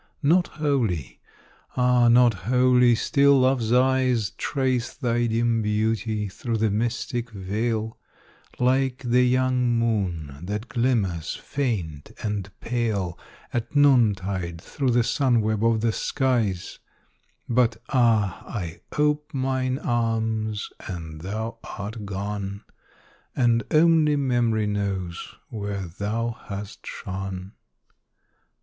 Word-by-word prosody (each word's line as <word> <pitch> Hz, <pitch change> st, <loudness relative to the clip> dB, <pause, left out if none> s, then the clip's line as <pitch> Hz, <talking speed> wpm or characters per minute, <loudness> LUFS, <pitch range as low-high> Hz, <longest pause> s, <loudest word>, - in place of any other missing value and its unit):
Not 175 Hz, +5 st, +4 dB
wholly 125 Hz, -, -1 dB, 0.6 s
ah! 125 Hz, -1 st, +4 dB
not 120 Hz, 0 st, +6 dB, 0.2 s
wholly 125 Hz, -1 st, +5 dB
still 140 Hz, +3 st, +4 dB
Love's 130 Hz, -3 st, +2 dB
eyes 125 Hz, -3 st, +3 dB
Trace 130 Hz, -3 st, -1 dB
thy 120 Hz, -3 st, 0 dB
dim 115 Hz, 0 st, +1 dB
beauty 110 Hz, 0 st, 0 dB
through 115 Hz, +4 st, -3 dB
the 110 Hz, -1 st, +1 dB
mystic 120 Hz, +2 st, -2 dB
veil, 110 Hz, +2 st, -2 dB, 0.6 s
Like 130 Hz, +1 st, +1 dB
the 120 Hz, +1 st, +4 dB
young 125 Hz, -1 st, +2 dB
moon 90 Hz, -11 st, -1 dB
that 105 Hz, +6 st, -4 dB
glimmers 105 Hz, -10 st, 0 dB
faint 95 Hz, -, -3 dB
and 105 Hz, -3 st, -2 dB
pale, 110 Hz, -7 st, -1 dB, 0.4 s
At 120 Hz, +5 st, -3 dB
noontide 100 Hz, -11 st, +3 dB
through 135 Hz, -, -2 dB
the 120 Hz, 0 st, +3 dB
sun 125 Hz, -1 st, +2 dB
web 110 Hz, 0 st, 0 dB
of 115 Hz, -1 st, +3 dB
the 115 Hz, 0 st, +2 dB
skies; 115 Hz, -8 st, -1 dB, 0.7 s
But 120 Hz, -2 st, +2 dB
ah! 115 Hz, -7 st, +2 dB
I 85 Hz, -7 st, -5 dB, 0.2 s
ope 150 Hz, +1 st, +1 dB
mine 130 Hz, -1 st, 0 dB
arms, 110 Hz, -4 st, -1 dB, 0.2 s
and 80 Hz, -4 st, -6 dB
thou 110 Hz, +5 st, -4 dB, 0.2 s
art 105 Hz, +1 st, -6 dB
gone, 100 Hz, 0 st, -4 dB, 0.7 s
And 120 Hz, -2 st, +3 dB
only 155 Hz, -1 st, +4 dB
Memory 120 Hz, -6 st, +1 dB
knows 100 Hz, -4 st, -3 dB
where 100 Hz, -3 st, -4 dB
thou 105 Hz, +7 st, -2 dB, 0.2 s
hast 100 Hz, +1 st, -7 dB
shone. 95 Hz, -1 st, -5 dB
115 Hz, 110 wpm, -25 LUFS, 100-125 Hz, 0.7 s, not